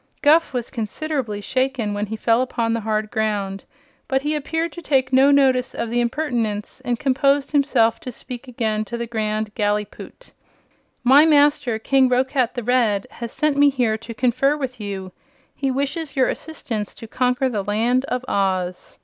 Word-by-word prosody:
Guph 315 +3 +5
was 245 -3 -4
considerably 235 -2 -3
shaken 255 -3 -1
when 205 +1 -2
he 220 - -4
fell 230 +2 +2
upon 230 -3 -1
the 230 - 0
hard 215 -1 -2
ground, 205 -3 -2 0.4
but 265 -2 0
he 300 +1 0
appeared 320 +3 -2
to 345 - -9
take 270 -4 +1
no 265 +2 +6
notice 265 -2 +3
of 230 - -3
the 240 0 +1
impertinence 235 -4 -2
and 245 -2 -1
composed 275 +2 +1
himself 270 -6 +2
to 255 - -7
speak 250 +2 -9
again 220 -3 -1
to 235 - -5
the 235 - -3
Grand 215 -2 -2
Gallipoot. 210 - -3 0.7
"My 280 +5 +7
master, 290 -5 +3
King 260 +3 +3
Roquat 255 0 +1
the 245 - -3
Red, 225 -5 +2
has 235 -1 -7
sent 305 -2 0
me 285 0 +6
here 245 -5 0
to 230 0 -9
confer 255 +5 +2
with 255 -4 -5
you. 195 -2 -5 0.4
He 275 - -1
wishes 280 +4 -2
your 260 -2 +3
assistance 225 -10 -5
to 225 - -10
conquer 250 +3 +1
the 215 -6 -2
Land 235 +6 +1
of 250 -2 -3
Oz." 185 -2 -2
250 Hz, 175 wpm, -21 LUFS, 220-275 Hz, 0.7 s, My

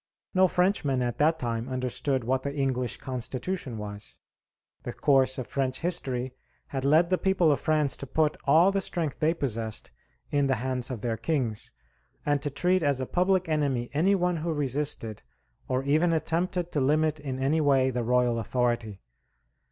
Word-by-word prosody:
No 185 -1 +5
Frenchman 175 -9 +1
at 120 -1 -3
that 160 +2 +3
time 120 -2 -3
understood 130 +1 -1
what 130 +3 0
the 140 +1 -4
English 130 -3 -1
Constitution 130 +2 -4
was. 105 0 -7 0.6
The - - -6
course 135 -2 +3
of 130 - -3
French 130 +2 -2
history 130 -8 -1 0.4
had 135 -1 -3
led 160 +5 +4
the 185 - +2
people 190 -5 +3
of 145 - +1
France 155 -3 +1
to 140 - -7
put 155 +3 +1
all 165 +7 +5
the 195 0 0
strength 165 -6 -3
they 160 +2 +2
possessed 115 - -3 0.4
in 145 -1 +2
the 135 - +2
hands 125 +1 -2
of 125 -5 -5
their 115 -1 -1
kings, 120 -4 -2 0.5
and 145 -1 +1
to 145 - -2
treat 180 +6 +1
as 140 -3 +1
a 130 - -2
public 185 +3 +1
enemy 140 -6 0
any 180 +7 +3
one 180 -2 +1
who 165 +2 -2
resisted, 140 -6 -2 0.5
or 130 +1 0
even 155 +5 +2
attempted 175 +2 -1
to 145 - 0
limit 155 +2 +2
in 135 -3 -4
any 140 +4 +1
way, 135 -3 +3
the 125 -1 -2
royal 125 0 +2
authority. 120 -4 -1
140 Hz, 175 wpm, -27 LUFS, 125-160 Hz, 0.6 s, No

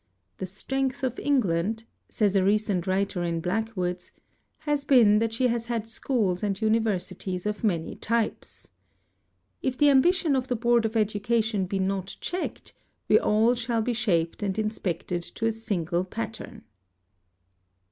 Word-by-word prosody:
"The 190 - -3
strength 265 +8 -2
of 255 -1 -1
England," 220 -5 +1 0.3
says 205 -3 +1
a 190 - +4
recent 200 -2 +1
writer 190 -1 0
in 170 -1 -1
Blackwood's, 180 -1 -2 0.5
"has 295 -2 0
been 230 -7 +6
that 225 0 0
she 230 +3 0
has 235 0 -2
had 230 -2 -2
schools 220 -6 -1
and 200 -2 -1
universities 200 -4 -1
of 210 +1 -3
many 170 -7 -1
types.... 230 0 -2 0.9
If 260 -1 -1
the 290 +1 +5
ambition 320 +2 +4
of 260 -1 -1
the 250 - 0
Board 235 0 +2
of 225 +1 -3
Education 215 -1 +1
be 195 - -2
not 190 0 -2
checked 360 +1 -4 0.3
we - - +6
shall - - -1 0.4
all 230 -1 +2
be 245 - 0
shaped 180 -8 0
and 200 -1 -1
inspected 180 -5 -2
to 225 +6 -5
a 225 - +3
single 180 -6 -2
pattern." 220 +3 -7
215 Hz, 145 wpm, -26 LUFS, 190-235 Hz, 0.9 s, been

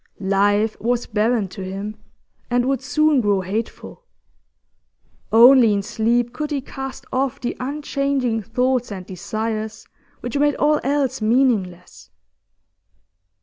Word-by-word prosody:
Life 205 +2 +2
was 240 +1 0
barren 215 0 0
to 185 - -9
him, 195 +3 -5 0.5
and 245 0 +1
would 270 +1 0
soon 305 0 +2
grow 205 -3 +1
hateful; 215 - -5 1.3
only 235 0 +7
in 200 -1 -1
sleep 235 +3 0
could 300 +4 -4
he 290 -2 -1
cast 270 0 -7
off 265 0 -1
the 245 - -3
unchanging 275 -3 -1
thoughts 250 +2 0
and 190 -2 -6
desires 215 +3 -4 0.4
which 245 +4 -3
made 290 0 +3
all 300 0 +2
else 275 -3 0
meaningless. 215 -7 0
240 Hz, 120 wpm, -21 LUFS, 210-270 Hz, 1.3 s, only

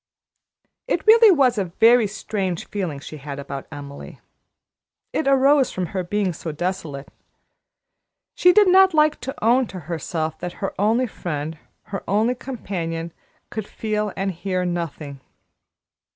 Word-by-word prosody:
It - - -1
really 450 +1 +8
was 265 - +4
a 195 - 0
very 225 +6 +4
strange 195 -4 -3
feeling 180 -9 -4
she 155 +2 -9
had 140 0 -7
about 140 -1 -7
Emily. 145 -1 -9 0.9
It 310 - -1
arose 275 0 +4
from 185 - -2
her 185 -1 -1
being 190 0 -1
so 160 0 -6
desolate. 155 -4 -4 1.2
She 360 - +5
did 415 +1 +5
not 380 -1 +6
like 305 0 +3
to 270 -1 -6
own 245 +2 +4
to 185 -3 -8
herself 160 0 -4
that 175 0 -5
her 195 - -4
only 225 +5 +3
friend, 160 -7 -5 0.2
her 195 - -6
only 215 +5 +2
companion, 170 -10 -5 0.4
could 215 -2 -5
feel 210 -1 -2
and 195 0 -1
hear 185 +1 -2
nothing. 160 -5 -4
195 Hz, 140 wpm, -22 LUFS, 165-245 Hz, 1.2 s, really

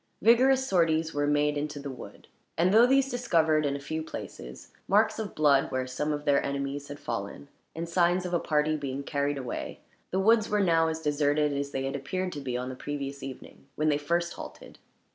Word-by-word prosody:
Vigorous 260 +4 +5
sorties 165 -3 +2
were 145 0 0
made 145 0 +2
into 150 0 -4
the 140 0 -6
wood; 125 - -11 0.3
and 180 +3 +3
though 230 +3 +7
these 270 +1 +3
discovered, 160 -11 +2
in 140 - -1
a - - -4
few 155 +3 -4
places, 65 - -8 0.2
marks 215 +3 +3
of 215 -2 -5
blood 145 -3 +3
where 130 -1 -1
some 150 +4 -2
of 145 0 -3
their 140 -1 +3
enemies 140 +1 -3
had 145 - -7
fallen, 100 +4 -5 0.3
and 165 +1 -4
signs 175 +1 +2
of 180 - -4
a 175 - +3
party 155 0 +1
being 140 -2 -4
carried 140 0 -1
away, 125 -3 -5 0.3
the 190 - -1
woods 220 +2 +4
were 210 -1 +1
now 165 -4 +3
as 160 0 -3
deserted 150 0 +1
as 140 0 -2
they 135 -1 -3
had 135 +1 -3
appeared 185 +7 -3
to 145 - -6
be 125 -2 -3
on 125 +1 -4
the 130 - -6
previous 140 0 -5
evening, 135 0 -10
when 155 +1 +1
they 145 - +2
first 170 +3 -1
halted. - - -10
150 Hz, 210 wpm, -28 LUFS, 140-175 Hz, 0.3 s, though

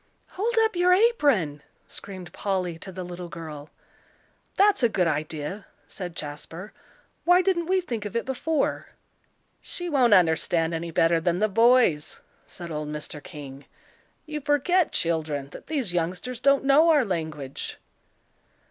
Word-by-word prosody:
"Hold 455 +5 -2
up 445 -3 0
your 355 +1 +4
apron," 285 - +2 0.2
screamed 185 -3 -9
Polly 185 -4 -2
to 190 - -8
the 185 0 -6
little 175 0 -7
girl. 155 -3 -8 0.9
"That's 405 -2 +4
a 235 - +4
good 185 -4 +1
idea," 155 +5 -3 0.2
said 175 -3 -7
Jasper. 160 +6 -7 0.5
"Why 355 +2 +5
didn't 345 -3 +1
we 375 0 +2
think 235 -11 -5
of 210 - -6
it 230 - 0
before?" 280 +3 -1 0.7
"She 350 0 -4
won't 250 -8 +5
understand 165 -1 +2
any 165 +1 -3
better 165 +1 +3
than 175 +1 0
the 215 +3 +2
boys," 225 -7 +3 0.3
said 170 -2 -9
old 150 -1 -4
Mr. 150 0 -6
King. 140 -4 -10 0.6
"You 300 -1 -5
forget, 295 +5 +2
children, 155 -4 -1
that - - -11
these 270 - -2
youngsters 180 +8 -2
don't 275 +1 +3
know 295 +5 +5
our 295 -6 +4
language." 155 -7 -4
185 Hz, 145 wpm, -25 LUFS, -, 0.9 s, Why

